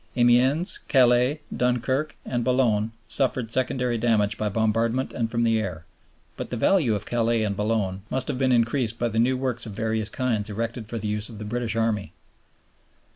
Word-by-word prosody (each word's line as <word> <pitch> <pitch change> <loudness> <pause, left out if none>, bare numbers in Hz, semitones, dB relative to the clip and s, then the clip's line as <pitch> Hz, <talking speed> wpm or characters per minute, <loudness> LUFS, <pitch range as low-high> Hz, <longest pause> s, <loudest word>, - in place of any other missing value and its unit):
Amiens, 125 +8 +3
Calais, 125 +3 +3
Dunkerque, 130 +4 0
and 120 -1 -2
Boulogne 115 -4 +1 0.2
suffered 125 -4 -1
secondary 125 -1 +1
damage 105 -3 +2
by 105 -1 -2
bombardment 115 +4 0
and 115 -2 -1
from 115 0 0
the 115 -1 +2
air; 90 -7 -5 0.5
but - - -6
the 125 - -3
value 130 - +3
of 100 - -4
Calais 115 -1 +1
and 100 -2 -1
Boulogne 105 -3 -1
must 130 -1 -1
have 125 - -2
been 130 -1 +2
increased 115 -1 +1
by 120 0 0
the 110 0 -1
new 130 +3 +2
works 125 -3 -2
of 105 - -7
various 110 0 -1
kinds 115 -5 -1
erected 115 +1 -4
for 115 - -4
the 110 -1 -4
use 105 0 -2
of 110 - -10
the 105 - -7
British 115 0 -2
Army. 105 -7 -1
115 Hz, 180 wpm, -25 LUFS, 110-125 Hz, 0.5 s, Amiens